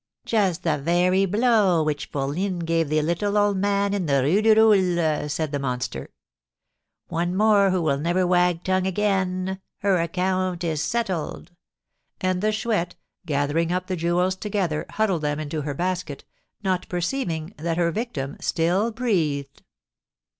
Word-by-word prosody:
"Just 190 -6 +1
the 155 -3 +1
very 180 +5 +2
blow 205 -5 +3
which 150 -1 -2
fourline 170 +6 -2
gave 165 -2 +1
the 155 0 +1
little 200 +6 0
old 205 -1 +3
man 200 +1 +1
in 190 -5 -1
the 140 -2 +2
Rue 175 +10 +3
du 220 0 +5
Roule!" 180 -9 +3
said 150 0 -2
the 145 - -2
monster. 125 - -3 1.0
"One 175 +2 -1
more 205 -1 +4
who 185 -2 0
will 140 -3 +1
never 175 +4 +1
wag 180 -1 +2
tongue 185 0 +1
again! 190 -1 -1 0.2
Her 195 -3 +2
account 185 +1 -1
is 160 -3 -1
settled!" 190 -8 -3 0.7
And 185 -1 0
the 215 +1 +2
Chouette, 215 -5 -1 0.3
gathering 150 +3 0
up 180 0 -1
the 185 -1 -3
jewels 175 +2 +1
together, 190 -6 -2
huddled 200 -7 0
them 150 0 -1
into 155 0 -3
her 145 -1 -4
basket, 180 -3 -3 0.4
not 185 -2 -1
perceiving 175 -2 -2
that 165 +1 -2
her 170 -1 +2
victim 165 - -4
still 180 +7 +1
breathed. 165 - -1
180 Hz, 150 wpm, -24 LUFS, 160-195 Hz, 1.0 s, du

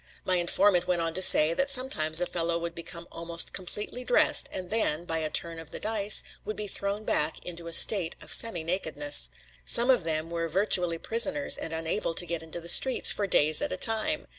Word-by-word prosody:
My 185 -1 0
informant 180 +1 +1
went 180 -1 -1
on 165 -1 -3
to 185 - -4
say 155 -3 +6
that 275 +10 -2
sometimes 250 - +2
a 180 - -1
fellow 170 -1 -2
would 170 0 -6
become 170 0 -10
almost 170 0 -4
completely 210 +6 -6
dressed 245 - +2
and 185 0 -7
then, 175 -7 -1
by 165 -2 -3
a 155 -1 -3
turn 165 +1 -3
of 165 -1 -12
the - - -9
dice, 215 -1 +3 0.2
would 215 - -7
be 210 - -5
thrown 200 +1 -5
back 155 -6 -2
into 170 -1 -9
a 165 - -8
state 180 -2 +3
of - - -8
semi 185 -8 +3
nakedness. 195 - 0 0.3
Some 240 +3 +4
of 245 -9 0
them 160 0 -4
were 165 -1 -4
virtually 180 -1 +1
prisoners 280 - 0
and 160 - -8
unable 165 +2 -4
to 175 - -1
get 170 -1 -5
into 160 +1 -9
the 170 - -11
streets 260 +9 +4
for 205 - -3
days 155 -4 +3
at 290 - -4
a - - -5
time. 245 +7 0
175 Hz, 215 wpm, -26 LUFS, 165-215 Hz, 0.3 s, say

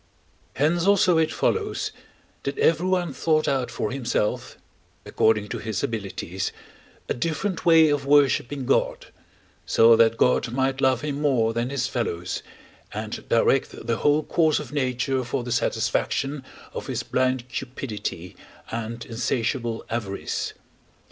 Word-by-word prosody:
Hence 165 +5 +2
also 185 -4 +5
it 160 - +2
follows, - - -1 0.5
that 140 - -4
everyone 175 0 +2
thought 155 +2 +1
out 130 -3 0
for 110 -2 -3
himself, 125 -5 -2 0.5
according 110 -2 +2
to - - -4
his 110 -2 -3
abilities, 95 -4 -3 0.6
a - - 0
different 165 +8 -2
way 160 -2 +7
of 145 -1 0
worshipping 140 -1 +3
God, - - 0 0.5
so 115 0 +6
that 115 0 +4
God 125 -1 +2
might 135 +1 0
love 130 -1 +3
him 145 -1 -3
more 120 -6 +2
than 120 +2 -1
his 140 -1 -1
fellows, 90 -8 -3 0.5
and 110 +1 -6
direct 115 +1 +2
the 115 -1 0
whole 150 +1 +3
course 160 -2 +2
of 140 -4 -6
nature 130 -1 0
for 120 +1 -3
the 120 - -5
satisfaction 125 +5 0 0.3
of - - -6
his - - -2
blind 130 -1 0
cupidity 110 -9 -5 0.4
and 115 +1 -4
insatiable 120 0 -2
avarice. 105 -4 -3
130 Hz, 135 wpm, -24 LUFS, 115-145 Hz, 0.6 s, way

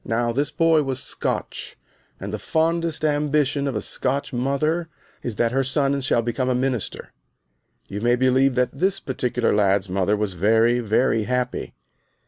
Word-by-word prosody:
Now 120 +1 0
this 140 +4 0
boy 165 0 +3
was 135 -2 -3
Scotch, - - -4 0.4
and 100 +2 -6
the 105 - -3
fondest 165 +1 0
ambition 145 -1 +1
of 135 - -2
a 105 - -1
Scotch 135 +1 -2
mother 150 +7 0 0.3
is 120 - -4
that 115 +1 +1
her 135 +2 +1
son 140 +1 +1
shall 120 -3 +1
become 125 +2 -1
a 125 - +2
minister. 125 -3 -3 0.7
You 100 +1 -5
may 120 +1 +3
believe 130 +1 +3
that 125 0 +1
this 195 +2 +1
particular 125 -4 -1
lad's 100 -2 +2
mother 95 +3 +1
was 105 -2 -2
very, 110 +6 +3
very 115 0 +1
happy. 125 +1 -2
130 Hz, 160 wpm, -23 LUFS, 115-140 Hz, 0.7 s, boy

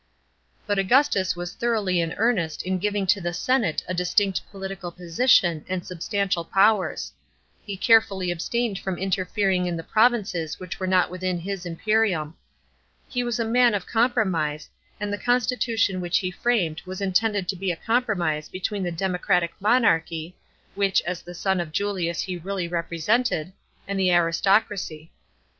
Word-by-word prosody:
But 205 -2 0
Augustus 195 -3 +3
was 175 0 -5
thoroughly 215 -7 0
in 165 -1 -2
earnest 200 -9 0
in 185 0 -1
giving 205 0 0
to 190 +1 +2
the 175 0 -2
senate 235 -7 +1
a 185 - -2
distinct 185 +2 +1
political 195 -3 -6
position 175 - +2
and 185 -1 -3
substantial 185 0 -1
powers. 195 +3 +2 0.5
He 200 -2 -6
carefully 195 -4 +3
abstained 205 +4 -2
from 190 -2 -3
interfering 190 0 0
in 175 -1 -2
the 165 - -6
provinces 210 -9 +1
which 180 -2 -7
were 185 - -2
not 185 -1 +3
within 185 0 -2
his 185 +1 -5
imperium. 175 -3 0 0.7
He 245 -1 -2
was 240 0 -2
a 230 - 0
man 240 0 +4
of 190 -3 -3
com 235 +2 +2
promise, 160 -10 -1 0.3
and 205 -1 -3
the 205 - -3
constitution 240 -5 +1
which 175 -1 +1
he 185 0 -2
framed 180 -7 0
was 185 0 -6
intended 200 0 +1
to 195 - 0
be 190 0 -1
a - - -3
compromise 180 -8 0
between 195 +2 -3
the 175 -2 -2
democratic 180 0 0
monarchy, 175 -7 +1 0.4
which 200 -2 +2
as 175 -1 -4
the 175 0 -10
son 190 +1 0
of 170 -3 -4
Julius 180 -2 -1
he 185 -2 -4
really 185 0 -3
represented, 170 +3 0 0.3
and 200 0 -2
the 185 -1 +3
aristocracy. 175 -1 +1
190 Hz, 155 wpm, -24 LUFS, 175-210 Hz, 0.7 s, man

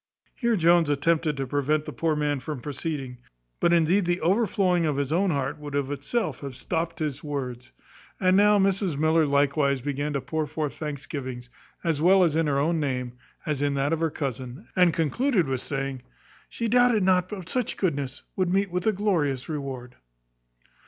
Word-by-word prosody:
Here 235 -2 +1
Jones 170 -3 +4
attempted 150 +1 +1
to 135 - -2
prevent 145 +3 0
the - - -6
poor 160 -2 0
man 145 -1 0
from 150 0 -5
proceeding; 140 -2 -5 0.4
but 170 - +3
indeed 170 +3 +3
the 175 +1 0
overflowing 185 -1 +2
of 145 -2 -1
his 140 0 -1
own 185 +4 +2
heart 140 -2 -2
would 145 -1 -6
of 140 -1 -1
itself 225 +11 -2
have 140 -3 -7
stopped 165 +6 -3
his 150 -3 -3
words. 130 -4 -5 0.5
And 185 0 +3
now 205 +1 +5
Mrs 195 -5 +1
Miller 155 +1 +3
likewise 140 -1 +2
began 145 +2 -3
to 140 - 0
pour 155 +3 -2
forth 150 -2 -3
thanksgivings, 135 -4 -6 0.3
as 165 -4 0
well 185 +3 +6
in 165 -1 +2
her 140 -1 +1
own 160 +4 +1
name, 125 -4 -2 0.3
as 150 -3 -1
in 145 -1 +1
that 140 +3 +1
of 165 - 0
her 165 0 +1
cousin, 130 -3 -5
and 180 -2 +5
concluded 175 - +1
with 130 -2 -2
saying, 135 -2 -3 0.5
"She 230 - -3
doubted 245 -2 +4
not 185 -1 +3
but 190 -5 -7
such 250 +3 -1
goodness 145 -7 -2
would 185 -2 0
meet 195 +1 +2 0.2
a - - +5
glorious 165 -11 0
reward." 135 -5 -6
150 Hz, 180 wpm, -26 LUFS, 140-180 Hz, 0.5 s, well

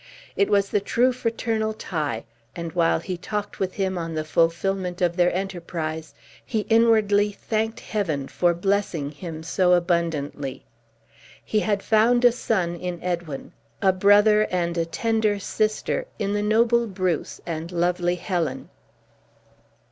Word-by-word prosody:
It 200 - +2
was 200 -1 +3
the 205 - +2
true 245 +5 +2
fraternal 225 -2 -1
tie; 150 - -3 0.3
and 170 -1 -5
while 170 -2 +3
he 180 +1 -4
talked 210 +3 -4
with 190 -1 -2
him 190 -2 -1
on 165 -1 -4
the 155 - -1
fulfillment 175 +3 0
of 175 -1 +1
their 175 -1 +3
enterprise, 170 -4 -4 0.3
he 220 -3 -1
inwardly 215 -3 +4
thanked 220 +2 -2
Heaven 160 -10 -2
for 175 -1 +1
blessing 175 -5 -1
him 160 +1 -7
so 180 +1 +2
abundantly. 165 -6 -1 0.8
He 215 - +1
had 205 -1 0
found 235 +3 +4
a 245 - +8
son 190 -7 -1
in 180 -1 -4
Edwin; 170 -6 -4 0.3
a 190 - +3
brother, 205 +3 +5
and 170 -2 -1
a 165 -1 0
tender 215 +4 0
sister 215 - -1
in 200 -1 -1
the 205 - 0
noble 230 +2 +3
Bruce 185 -5 -2
and 165 0 -4
lovely 175 0 +1
Helen. 170 -6 -3
185 Hz, 140 wpm, -24 LUFS, 170-210 Hz, 0.8 s, a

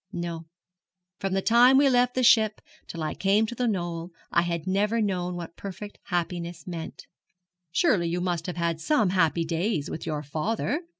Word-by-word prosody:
No; 170 -3 -5 0.7
from 195 -2 -2
the 195 0 0
time 245 +3 +6
we 280 0 +5
left 250 -1 +3
the 255 - +1
ship 220 -3 +5 0.3
till 165 -2 -5
I 155 - -2
came 200 +3 +2
to 220 - -5
The 245 0 -1
Knoll 175 -4 -2 0.2
I 170 - +4
had 170 -1 -2
never 205 +4 +1
known 180 -4 -1
what 170 -1 -7
perfect 200 +1 -8
happiness 175 -2 -3
meant.' 170 -3 -7 0.7
'Surely 195 - +2
you 175 +1 -1
must 175 -2 -2
have 180 - -5
had 170 -1 -1
some 215 - +2
happy 165 -2 +2
days 165 -1 -1
with 160 - -6
your 150 -2 -2
father?' 210 - -2
180 Hz, 180 wpm, -26 LUFS, 170-215 Hz, 0.7 s, time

